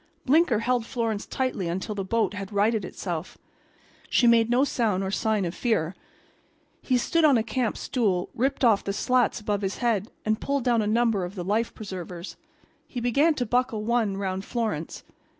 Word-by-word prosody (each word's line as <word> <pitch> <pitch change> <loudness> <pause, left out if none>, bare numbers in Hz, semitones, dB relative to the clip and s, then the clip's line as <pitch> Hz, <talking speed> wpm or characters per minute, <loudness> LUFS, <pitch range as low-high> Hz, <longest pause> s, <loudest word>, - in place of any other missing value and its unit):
Blinker 285 -3 +4
held 245 0 +1
Florence 225 -3 -2
tightly 255 -9 -2
until 190 +5 -3
the 200 -1 -3
boat 225 +3 0
had 200 -1 -6
righted 210 +1 +2
itself. 175 -2 -5 0.7
She 245 - +3
made 230 -1 +5
no 245 +3 +4
sound 220 -8 0
or 190 - -2
sign 210 0 0
of 170 - -3
fear. 195 -9 0 0.9
He 255 - +1
stood 330 +7 +1
on 290 -5 +6
a 220 - +1
camp 245 0 -1
stool, 200 -9 0
ripped 265 +2 0
off 215 -4 +4
the 200 - -2
slats 250 +3 +1
above 210 -1 -2
his 195 0 -2
head 225 -4 0 0.2
and 215 0 0
pulled 280 -2 -1
down 235 -2 +3
a 210 - -1
number 225 -3 +2
of 180 +3 -6
the 180 -3 -5
life 220 +4 0
preservers. 185 -3 -7 0.5
He 250 - -5
began 275 +7 +3
to 250 - -1
buckle 240 -2 0
one 225 -3 +1
around 190 -1 -3
Florence. 215 -9 -3
220 Hz, 185 wpm, -26 LUFS, 195-245 Hz, 0.9 s, on